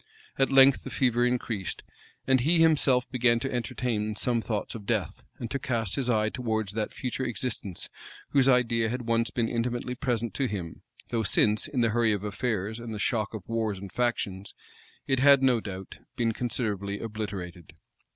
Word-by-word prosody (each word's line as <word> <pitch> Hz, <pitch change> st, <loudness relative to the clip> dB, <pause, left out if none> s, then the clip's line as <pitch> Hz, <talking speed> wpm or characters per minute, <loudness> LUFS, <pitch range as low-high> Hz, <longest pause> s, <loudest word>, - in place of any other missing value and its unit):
At 135 Hz, -, +3 dB
length 135 Hz, 0 st, +7 dB
the -, -, -6 dB
fever 120 Hz, -2 st, +2 dB
increased, 115 Hz, -6 st, -3 dB, 0.4 s
and 130 Hz, -1 st, +4 dB
he 160 Hz, +8 st, +3 dB
himself 145 Hz, -6 st, +4 dB
began 125 Hz, -2 st, +3 dB
to 135 Hz, -, -3 dB
entertain 110 Hz, -2 st, -2 dB
some 120 Hz, +1 st, 0 dB
thoughts 110 Hz, -2 st, -3 dB
of 105 Hz, -3 st, -9 dB
death, 105 Hz, -8 st, -1 dB
and 115 Hz, 0 st, -6 dB
to 140 Hz, -, -1 dB
cast 115 Hz, -7 st, -1 dB
his 130 Hz, -3 st, -1 dB
eye 110 Hz, -2 st, +2 dB
towards 110 Hz, -4 st, -2 dB
that 110 Hz, -1 st, -2 dB
future 130 Hz, +1 st, -4 dB
existence, 115 Hz, -6 st, -3 dB, 0.4 s
whose 135 Hz, -2 st, +4 dB
idea 115 Hz, -3 st, +3 dB
had 125 Hz, +2 st, -3 dB
once 115 Hz, 0 st, +1 dB
been 115 Hz, -2 st, -1 dB
intimately 120 Hz, +1 st, -2 dB
present 120 Hz, -3 st, -2 dB
to 135 Hz, -, 0 dB
him; 90 Hz, -7 st, -5 dB, 0.3 s
though 115 Hz, -, 0 dB
since, 105 Hz, +2 st, +2 dB
in 140 Hz, -5 st, -1 dB
the 115 Hz, -, +3 dB
hurry 110 Hz, -1 st, +2 dB
of 100 Hz, -1 st, -3 dB
affairs, 105 Hz, 0 st, -2 dB
and 115 Hz, -2 st, -6 dB
the -, -, -4 dB
shock 110 Hz, 0 st, -1 dB
of 100 Hz, -4 st, -8 dB
wars 110 Hz, -3 st, -1 dB
and 95 Hz, 0 st, -8 dB
factions, 100 Hz, -5 st, -2 dB, 0.5 s
it 135 Hz, -2 st, +1 dB
had, 140 Hz, 0 st, +6 dB
no 125 Hz, -3 st, +4 dB
doubt, 95 Hz, -3 st, -8 dB, 0.2 s
been 115 Hz, -3 st, +1 dB
considerably 105 Hz, -4 st, -2 dB
obliterated. 100 Hz, -7 st, -6 dB
115 Hz, 180 wpm, -28 LUFS, 105-125 Hz, 0.5 s, length